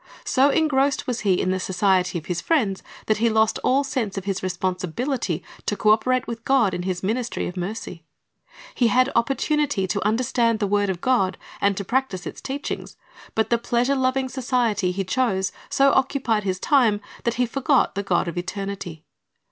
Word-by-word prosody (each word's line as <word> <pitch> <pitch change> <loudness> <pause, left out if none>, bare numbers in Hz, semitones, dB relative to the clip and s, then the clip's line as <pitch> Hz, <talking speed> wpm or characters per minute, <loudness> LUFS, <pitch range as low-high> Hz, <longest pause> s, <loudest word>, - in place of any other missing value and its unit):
So 270 +2 +4
engrossed 285 -2 +2
was 245 -3 -2
he 195 -4 +2
in 185 - 0
the 185 - 0
society 185 -1 +1
of 155 - -7
his 180 -1 -2
friends 225 -13 +1 0.2
that 215 - +1
he 230 +2 +2
lost 220 0 +2
all 270 +2 +3
sense 235 -8 -3
of 195 - -4
his 195 -2 -2
responsibility 185 - -2 0.2
to 205 - 0
co 210 +2 +4
operate 255 +3 +2
with 230 -1 -6
God 240 -8 +3
in 175 - -2
His 180 0 -3
ministry 235 +4 -1
of 180 - -7
mercy. 180 -2 -5 0.7
He 240 - +2
had 255 +3 +3
opportunity 280 -3 +1
to 200 +2 -2
understand 230 +1 +1
the 210 - 0
word 205 0 +1
of 180 -2 -3
God, 195 -8 +1 0.2
and 200 -1 +2
to 200 - -3
practise 235 -6 -1
its - - -7
teachings; 280 +2 -5 0.4
but 220 0 0
the 235 - +3
pleasure 240 +3 +1
loving 260 0 +1
society 245 -7 0
he 195 +2 -2
chose 190 -3 0 0.2
so 275 0 +4
occupied 245 -6 +1
his 185 -1 -1
time 235 -7 +3 0.2
that 235 - 0
he 250 - +2
forgot 275 +3 +1
the 200 - -2
God 185 -3 0
of 170 +1 -3
eternity. 185 -3 -5
220 Hz, 185 wpm, -23 LUFS, 190-255 Hz, 0.7 s, So